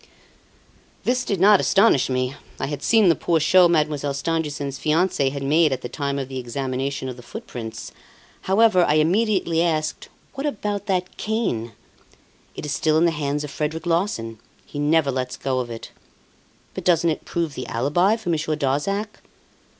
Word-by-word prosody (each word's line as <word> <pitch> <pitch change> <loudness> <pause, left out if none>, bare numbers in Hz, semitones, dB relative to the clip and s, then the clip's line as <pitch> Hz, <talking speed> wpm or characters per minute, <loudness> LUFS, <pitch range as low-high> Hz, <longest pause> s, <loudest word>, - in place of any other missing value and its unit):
This 250 0 +1
did 200 -6 -2
not 200 +1 +6
astonish 195 - +3
me. 130 0 -1 0.3
I - - -1
had 145 0 -5
seen 220 -4 +4
the 170 - +6
poor 170 -2 +1
show 180 +3 +6
Mademoiselle 150 -4 0
Stangerson's 145 -3 -2
fiance 155 -3 +1
had 140 0 -5
made 155 +2 +3
at 130 -1 -2
the 120 - -6
time 140 +1 -3
of 135 -2 -3
the 130 -1 -5
examination 130 +2 -3
of 125 -1 -6
the - - -10
footprints. 120 - -8 0.6
However, 200 -2 +5
I 150 - +2
immediately 170 0 +2
asked: 155 -2 -1 0.2
"What 275 +2 -3
about 205 -5 -3
that 185 -2 -1
cane?" 160 - -2 0.8
"It - - -6
is 150 - -4
still 155 +1 +2
in 165 - +4
the 170 - +3
hands 150 -1 -2
of 145 - -6
Frederic 155 +3 -3
Larsan. 165 - -1 0.3
He 145 - -7
never 150 -1 +2
lets 125 -1 -3
go 130 -1 -1
of 125 -1 -3
it." 115 -1 -8 0.8
"But - - -6
doesn't 170 -2 +3
it 155 - -4
prove 165 -3 -2
the 130 - -6
alibi 150 - +2
for 220 -5 -6
Monsieur 155 -1 0
Darzac?" 160 +10 -2
155 Hz, 175 wpm, -23 LUFS, 135-180 Hz, 0.8 s, not